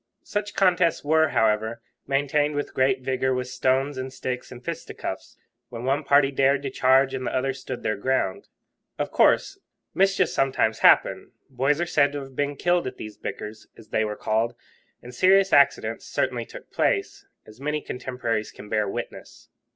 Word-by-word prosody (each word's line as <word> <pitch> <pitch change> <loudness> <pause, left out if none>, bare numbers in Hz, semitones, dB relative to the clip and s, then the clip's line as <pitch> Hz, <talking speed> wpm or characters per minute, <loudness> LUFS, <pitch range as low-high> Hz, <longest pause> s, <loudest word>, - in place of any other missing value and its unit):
Such 205 0 -4
contests 180 -3 +2
were, 160 +2 +3
however, 110 -2 +1 0.3
maintained 145 +2 +1
with 145 - -3
great 130 0 +2
vigour 130 0 0
with 125 0 -3
stones 130 +2 0
and 130 0 -5
sticks 125 -1 -5
and 125 -1 -11
fisticuffs, - - -6 0.3
when 115 -1 -7
one 135 +4 0
party 140 0 +4
dared 135 +1 +2
to 135 - -3
charge 130 +1 +3
and 130 -1 -3
the - - -2
other 135 +1 0
stood 130 -1 -7
their 110 - -1
ground. 100 -4 -1 0.5
Of - - -3
course - - +3 0.3
mischief 195 +1 +2
sometimes 130 -5 +1
happened; - - +4 0.2
boys 135 +4 +1
are 175 - +1
said 145 -4 +2
to 145 - -3
have 135 -1 -11
been 145 +1 -1
killed 175 +1 +1
at 130 - -7
these 110 -1 -8
bickers, 110 +1 -7
as 110 -2 -15
they 110 - +1
were 105 -1 -3
called, 115 +2 0 0.5
and 125 +1 -10
serious 190 +6 +4
accidents 135 -5 +3
certainly 125 -3 -1
took - - -12
place, - - -1 0.2
as 110 +4 -16
many 150 +1 -1
contemporaries 125 -5 -3
can 105 - -12
bear 105 -2 0
witness. - - -8
130 Hz, 175 wpm, -25 LUFS, 120-145 Hz, 0.5 s, party